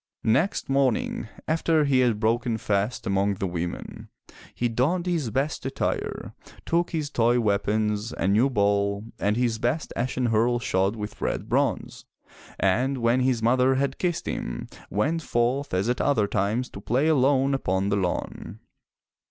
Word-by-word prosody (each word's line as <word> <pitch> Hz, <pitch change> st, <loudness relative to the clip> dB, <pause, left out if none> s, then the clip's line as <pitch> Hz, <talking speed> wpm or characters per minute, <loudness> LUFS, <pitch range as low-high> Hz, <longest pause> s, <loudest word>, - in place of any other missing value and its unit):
Next 160 Hz, -, +1 dB
morning, 135 Hz, -3 st, 0 dB, 0.2 s
after 160 Hz, -1 st, +2 dB
he 135 Hz, -2 st, +3 dB
had 120 Hz, -4 st, +2 dB
broken 115 Hz, +1 st, +1 dB
fast 105 Hz, +2 st, -1 dB
among 100 Hz, +1 st, +1 dB
the 95 Hz, -, -3 dB
women, 85 Hz, -1 st, -5 dB, 0.5 s
he 120 Hz, -, 0 dB
donned 140 Hz, +10 st, 0 dB
his 165 Hz, -9 st, -1 dB
best 135 Hz, +7 st, -1 dB
attire, 135 Hz, +1 st, -3 dB, 0.3 s
took 170 Hz, +1 st, +1 dB
his 155 Hz, -3 st, -3 dB
toy 120 Hz, 0 st, +3 dB
weapons, 105 Hz, +1 st, 0 dB
a -, -, -1 dB
new 110 Hz, +7 st, +3 dB
ball, 100 Hz, -3 st, +1 dB, 0.2 s
and 105 Hz, +2 st, +1 dB
his 120 Hz, -3 st, 0 dB
best 125 Hz, +8 st, -1 dB
ashen 125 Hz, +1 st, -1 dB
hurle 115 Hz, +2 st, +2 dB
shod 95 Hz, -1 st, 0 dB
with 105 Hz, -1 st, -7 dB
red -, -, -2 dB
bronze, -, -, -1 dB, 0.5 s
and 125 Hz, +8 st, +1 dB
when 120 Hz, +1 st, +2 dB
his 125 Hz, -3 st, +1 dB
mother 130 Hz, +3 st, +3 dB
had 135 Hz, 0 st, -1 dB
kissed 175 Hz, -3 st, -1 dB
him, -, -, -4 dB, 0.2 s
went 150 Hz, -, 0 dB
forth 130 Hz, +1 st, 0 dB
as 95 Hz, +3 st, 0 dB
at 125 Hz, +1 st, 0 dB
other 135 Hz, -8 st, +2 dB
times 105 Hz, +5 st, -1 dB
to 100 Hz, -, -9 dB
play 125 Hz, +8 st, +1 dB
alone 135 Hz, -2 st, +3 dB
upon 95 Hz, -6 st, 0 dB
the 100 Hz, -, +1 dB
lawn. 90 Hz, -3 st, -3 dB
120 Hz, 155 wpm, -25 LUFS, 105-135 Hz, 0.5 s, he